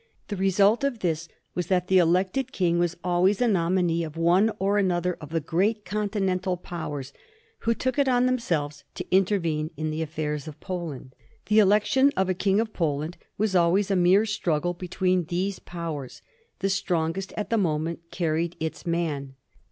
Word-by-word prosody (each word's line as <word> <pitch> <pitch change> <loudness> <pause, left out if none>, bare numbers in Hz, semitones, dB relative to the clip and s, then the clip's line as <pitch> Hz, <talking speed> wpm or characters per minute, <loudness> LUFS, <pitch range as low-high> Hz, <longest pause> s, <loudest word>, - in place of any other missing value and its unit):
The 205 - -2
result 195 +6 +3
of 275 -5 -1
this 170 -2 -1 0.3
was 180 -2 -2
that 180 -1 +1
the 190 0 +5
elected 185 +9 +1
king 175 -2 +1
was 175 0 0
always 180 +3 +2
a 245 - +3
nominee 175 -3 +1
of 160 0 -7
one 180 +6 +4
or 200 +2 +1
another 180 -2 +1
of 150 - -8
the 165 +1 0
great 195 +8 0
Continental 195 -3 -1
Powers 145 -6 -6 0.5
who 230 0 +1
took 260 +3 -1
it 280 - +3
on 250 0 +3
them 255 0 +2
selves 145 -9 -2
to - - -5
intervene 170 -6 +1
in 155 0 -2
the 155 +1 -3
affairs 150 -1 -3
of 155 -1 -9
Poland. 165 -9 -6 0.3
The 215 +1 +4
election 215 +7 +4
of 190 0 +2
a - - +3
King 195 +2 +1
of 225 -1 -1
Poland 155 0 -1 0.2
was 210 -2 0
always 185 +3 +3
a - - +3
mere 185 +4 +4
struggle 175 -5 0
between 180 0 0
these 185 +4 -2
Powers: 160 -6 -6 0.4
the 195 - +1
strongest 180 -1 -1
at 210 - -3
the 230 - +3
moment 165 -2 -1
carried 170 0 -1
its 160 +3 -4
man. 150 -6 -2
180 Hz, 175 wpm, -26 LUFS, 165-200 Hz, 0.5 s, the